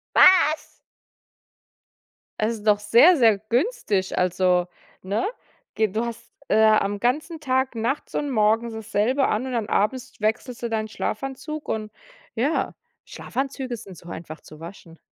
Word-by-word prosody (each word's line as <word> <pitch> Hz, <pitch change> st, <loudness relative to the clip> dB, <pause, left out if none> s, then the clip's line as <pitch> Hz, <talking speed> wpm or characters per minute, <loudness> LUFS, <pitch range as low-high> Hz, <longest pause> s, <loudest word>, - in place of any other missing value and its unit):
Was? 340 Hz, -4 st, +5 dB, 1.6 s
Es 220 Hz, +2 st, +1 dB
ist 215 Hz, -1 st, -10 dB
doch 210 Hz, -1 st, +5 dB
sehr, 235 Hz, -, +6 dB
sehr 225 Hz, -7 st, +4 dB
günstig, 235 Hz, -, 0 dB
also 180 Hz, 0 st, +2 dB, 0.3 s
ne? 200 Hz, +4 st, -1 dB, 0.5 s
Ge 220 Hz, -1 st, +2 dB
du 215 Hz, +4 st, -2 dB
hast, 235 Hz, -1 st, -8 dB, 0.2 s
äh, 220 Hz, -, +4 dB
am 205 Hz, -2 st, +3 dB
ganzen 300 Hz, -, -1 dB
Tag 260 Hz, -2 st, 0 dB
nachts 235 Hz, +6 st, -3 dB
und 290 Hz, -1 st, -1 dB
morgens 225 Hz, 0 st, +2 dB
dasselbe 220 Hz, +5 st, 0 dB
an 215 Hz, +4 st, 0 dB
und 260 Hz, -, -4 dB
dann 225 Hz, -3 st, -2 dB
abends 245 Hz, +4 st, -1 dB
wechselst 230 Hz, +3 st, -2 dB
du 235 Hz, -, -2 dB
deinen 220 Hz, -1 st, -1 dB
Schlafanzug 270 Hz, +8 st, -5 dB
und 215 Hz, -1 st, -3 dB, 0.5 s
ja, 275 Hz, +8 st, 0 dB, 0.3 s
Schlafanzüge 265 Hz, -2 st, -4 dB
sind 200 Hz, -5 st, -11 dB
so 175 Hz, -, -14 dB
einfach 160 Hz, -2 st, -8 dB
zu 155 Hz, -, -14 dB
waschen. 165 Hz, -1 st, -11 dB
225 Hz, 145 wpm, -24 LUFS, 210-260 Hz, 1.6 s, sehr